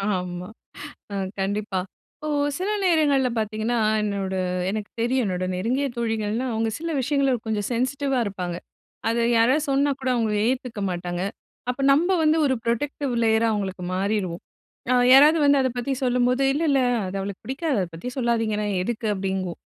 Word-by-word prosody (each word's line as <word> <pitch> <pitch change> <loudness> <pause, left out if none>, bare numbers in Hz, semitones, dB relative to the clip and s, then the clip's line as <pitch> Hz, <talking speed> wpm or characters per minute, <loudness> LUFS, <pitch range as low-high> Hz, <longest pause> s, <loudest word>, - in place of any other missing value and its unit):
ஆமா. 180 0 -4 0.7
அ - - -2 0.2
கண்டிப்பா. 200 0 -1 0.5
ஓ! - - -2 0.3
சில 375 +3 -2
நேரங்கள்ல 295 -7 +3
பார்த்தீங்கன்னா, 220 +2 -1 0.3
என்னோட 200 -2 -2 0.3
எனக்கு 210 0 -3
தெரியும் 250 +2 +1
என்னோட 185 -2 -1
நெருங்கிய 250 +9 0
தோழிகள்ன்னா, 225 +1 -1
அவுங்க 225 0 0
சில 330 0 -3
விஷயங்கள 275 0 +1
கொஞ்சம் 210 -2 -1
சென்சிட்டிவா 265 +2 0
இருப்பாங்க. 180 -4 -4 0.5
அதை 235 +1 +1 0.2
யாராவது 260 +7 +3
சொன்னாக்கூட 275 -1 +1
அவுங்க 225 -3 0
ஏத்துக்க 250 -4 -2
மாட்டாங்க. 175 0 -3 0.5
அப்ப 250 +2 -2
நம்ப 340 +6 +2
வந்து 310 +1 +4
ஒரு 265 -2 +2
ப்ரொடெக்டிவ் 265 +3 -1
லேயரா 225 0 +3
அவுங்களுக்கு 190 -3 -3
மாறிருவோம். 190 -3 -1 0.5
அ - - +5 0.2
யாராவது 300 +4 +7
வந்து 285 -1 +5
அத 260 - +1
பத்தி 255 +3 -1
சொல்லும்போது, 250 +1 +2
"இல்ல 300 +4 -1
இல்ல 275 -1 +3 0.3
அது 185 +1 -4
அவளுக்கு 195 0 -6
பிடிக்காது. 270 +1 -1
அத 180 - -2
பத்தி 170 +10 -5
சொல்லாதீங்கண்ணா 225 -4 0 0.2
எதுக்கு?" 230 +1 -3
அப்பிடிங்குவோம். 190 -2 -3
230 Hz, 150 wpm, -24 LUFS, 200-270 Hz, 0.7 s, யாராவது